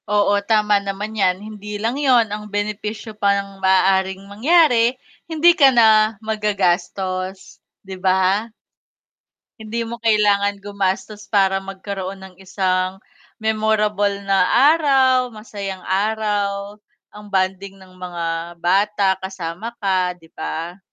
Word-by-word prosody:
Oo, 205 Hz, -1 st, +2 dB
tama 210 Hz, -2 st, +3 dB
naman 200 Hz, +2 st, -5 dB
'yan. 190 Hz, -4 st, +1 dB
Hindi 210 Hz, -1 st, -7 dB
lang 225 Hz, +3 st, -1 dB
yun, 250 Hz, -5 st, +4 dB
ang 210 Hz, 0 st, -6 dB
benepisyo 210 Hz, +1 st, -4 dB
pa 200 Hz, -2 st, +1 dB
ng 195 Hz, -1 st, -7 dB
maaaring 190 Hz, 0 st, +2 dB
mangyari 245 Hz, -, +3 dB, 0.3 s
hindi 330 Hz, +2 st, +5 dB
ka 275 Hz, -2 st, +6 dB
na 220 Hz, -3 st, +4 dB
maggagastos, 190 Hz, -2 st, -2 dB, 0.2 s
di 190 Hz, 0 st, -7 dB
ba? 190 Hz, +4 st, +1 dB, 1.1 s
Hindi 220 Hz, +2 st, -4 dB
mo 235 Hz, +1 st, -7 dB
kailangan 205 Hz, -2 st, +2 dB
gumastos 200 Hz, +1 st, -3 dB
para 195 Hz, -2 st, +2 dB
magkaroon 195 Hz, 0 st, -6 dB
ng 190 Hz, -1 st, -13 dB
isang 185 Hz, 0 st, -1 dB, 0.4 s
memorable 215 Hz, -2 st, 0 dB
na 195 Hz, -2 st, +2 dB, 0.3 s
araw, 265 Hz, -5 st, +3 dB
masayang 200 Hz, -3 st, -7 dB
araw 205 Hz, 0 st, -1 dB, 0.3 s
ang 210 Hz, 0 st, -12 dB
bonding 190 Hz, 0 st, -2 dB
ng 190 Hz, -1 st, -17 dB
mga 175 Hz, -2 st, -5 dB, 0.4 s
bata 200 Hz, +3 st, +2 dB
kasama 190 Hz, +4 st, -6 dB
ka, 185 Hz, -2 st, +1 dB
di 165 Hz, -2 st, -21 dB
ba? 170 Hz, +4 st, -6 dB
200 Hz, 120 wpm, -20 LUFS, 190-215 Hz, 1.1 s, ka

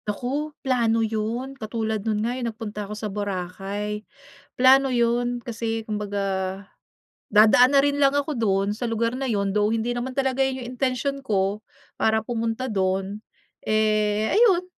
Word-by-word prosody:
Naku, 260 Hz, +8 st, -2 dB, 0.2 s
plano 230 Hz, -3 st, +2 dB
'yun, 225 Hz, +5 st, -3 dB
katulad 220 Hz, -3 st, -3 dB
no'n 215 Hz, 0 st, -1 dB
nga, 240 Hz, -, -1 dB
eh, 255 Hz, -, -5 dB
nagpunta 215 Hz, -3 st, -5 dB
ako -, -, -4 dB
sa 215 Hz, -, -5 dB
Boracay. 200 Hz, +1 st, -4 dB, 0.5 s
Plano 265 Hz, +1 st, +5 dB
'yun, 240 Hz, 0 st, +1 dB
kasi 225 Hz, -1 st, -4 dB
kumbaga, 195 Hz, -2 st, -3 dB, 0.6 s
dadaan 225 Hz, +6 st, +6 dB
na -, -, +8 dB
rin 285 Hz, 0 st, 0 dB
lang 275 Hz, -1 st, +5 dB
ako 285 Hz, +2 st, -1 dB
do'n 200 Hz, -4 st, +1 dB
sa 235 Hz, +2 st, -3 dB
lugar 230 Hz, +1 st, 0 dB
na 265 Hz, +1 st, -3 dB
'yun, 200 Hz, -3 st, 0 dB
though 210 Hz, 0 st, +2 dB
hindi 230 Hz, +2 st, 0 dB
naman 255 Hz, +2 st, -4 dB
talaga 265 Hz, -1 st, +1 dB
'yun 265 Hz, -1 st, +1 dB
'yung 245 Hz, -, -7 dB
intensyon 270 Hz, +2 st, -1 dB
ko 205 Hz, -4 st, 0 dB, 0.3 s
para 220 Hz, 0 st, +1 dB
pumunta 230 Hz, +1 st, -2 dB
do'n, 195 Hz, -2 st, -1 dB, 0.5 s
eh, 215 Hz, 0 st, +2 dB
ayun 390 Hz, -6 st, +4 dB
225 Hz, 155 wpm, -24 LUFS, 210-255 Hz, 0.6 s, na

